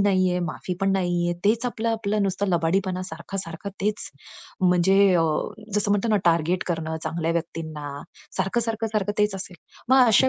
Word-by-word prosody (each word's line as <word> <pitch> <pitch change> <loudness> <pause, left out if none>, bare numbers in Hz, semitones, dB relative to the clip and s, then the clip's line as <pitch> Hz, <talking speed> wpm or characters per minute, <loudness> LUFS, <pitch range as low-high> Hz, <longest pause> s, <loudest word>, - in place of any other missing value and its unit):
नाहीये, 185 -2 +3
माफी 175 +2 -3
पण 195 0 +2
नाहीये, 175 -2 +1
तेच 225 +4 +3
आपलं-आपलं 220 -3 -1
नुसतं 200 +1 0
लबाडीपणा 185 +2 +1
सारखा-सारखा 170 +1 -6
तेच. 210 +1 -1 0.5
म्हणजे 180 +1 +4 0.2
अ, 165 - +4 0.5
जसं 205 0 +1
म्हणतो 205 +3 +1
ना, 215 - +4
टार्गेट 170 +1 +2
करणं, 160 -2 -2
चांगल्या 165 0 -1
व्यक्तींना. 160 -3 -4 0.5
सारखं-सारखं, 225 +4 0
सारखं 205 -1 0
तेच 210 -1 +2
असेल. 185 -2 -6 0.3
मग 260 -1 +7
अशा 230 +4 +5
190 Hz, 145 wpm, -24 LUFS, 170-210 Hz, 0.5 s, मग